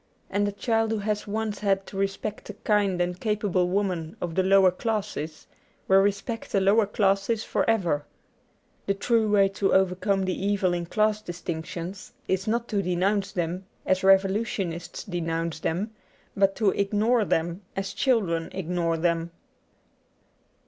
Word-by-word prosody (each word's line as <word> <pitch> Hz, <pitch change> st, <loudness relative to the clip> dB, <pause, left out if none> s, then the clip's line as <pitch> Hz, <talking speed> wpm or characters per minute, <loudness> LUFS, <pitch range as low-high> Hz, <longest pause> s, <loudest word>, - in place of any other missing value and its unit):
And 205 Hz, 0 st, +1 dB
a -, -, -1 dB
child 225 Hz, +2 st, 0 dB
who 220 Hz, -, 0 dB
has 210 Hz, 0 st, -2 dB
once 215 Hz, 0 st, -2 dB
had 195 Hz, -2 st, +1 dB
to -, -, -11 dB
respect 195 Hz, +2 st, -3 dB
a -, -, -5 dB
kind 205 Hz, -4 st, +1 dB
and 175 Hz, 0 st, -1 dB
capable 205 Hz, -5 st, 0 dB
woman 180 Hz, -4 st, -1 dB
of 170 Hz, -2 st, -3 dB
the 190 Hz, -, +2 dB
lower 190 Hz, 0 st, +5 dB
classes 195 Hz, -7 st, -3 dB, 0.4 s
will 190 Hz, 0 st, +6 dB
respect 205 Hz, +4 st, -1 dB
the 200 Hz, -, +3 dB
lower 200 Hz, +2 st, +4 dB
classes 205 Hz, +1 st, +1 dB
for -, -, 0 dB
ever. 175 Hz, -10 st, +1 dB, 0.8 s
The 200 Hz, -, +1 dB
true 220 Hz, +2 st, +2 dB
way 200 Hz, -1 st, +5 dB
to 195 Hz, 0 st, +1 dB
overcome 190 Hz, +1 st, +2 dB
the 185 Hz, -, 0 dB
evil 200 Hz, -3 st, +1 dB
in 175 Hz, -1 st, -3 dB
class 215 Hz, +2 st, +1 dB
distinc 175 Hz, -4 st, -5 dB
tions 180 Hz, +3 st, -7 dB
is 190 Hz, +2 st, -1 dB
not 235 Hz, +2 st, 0 dB
to 205 Hz, -3 st, +1 dB
denounce 190 Hz, +3 st, 0 dB
them 180 Hz, +2 st, -3 dB, 0.2 s
as 185 Hz, 0 st, +1 dB
revolutionists 195 Hz, -2 st, +1 dB
denounce 165 Hz, -3 st, -3 dB
them, 185 Hz, +7 st, -2 dB, 0.4 s
but 195 Hz, -1 st, +3 dB
to 210 Hz, -4 st, +3 dB
ignore 215 Hz, +4 st, +2 dB
them 170 Hz, 0 st, -1 dB
as 195 Hz, 0 st, -3 dB
children 185 Hz, -11 st, +1 dB
ignore 170 Hz, -2 st, -1 dB
them. 170 Hz, 0 st, 0 dB
195 Hz, 155 wpm, -26 LUFS, 175-210 Hz, 0.8 s, will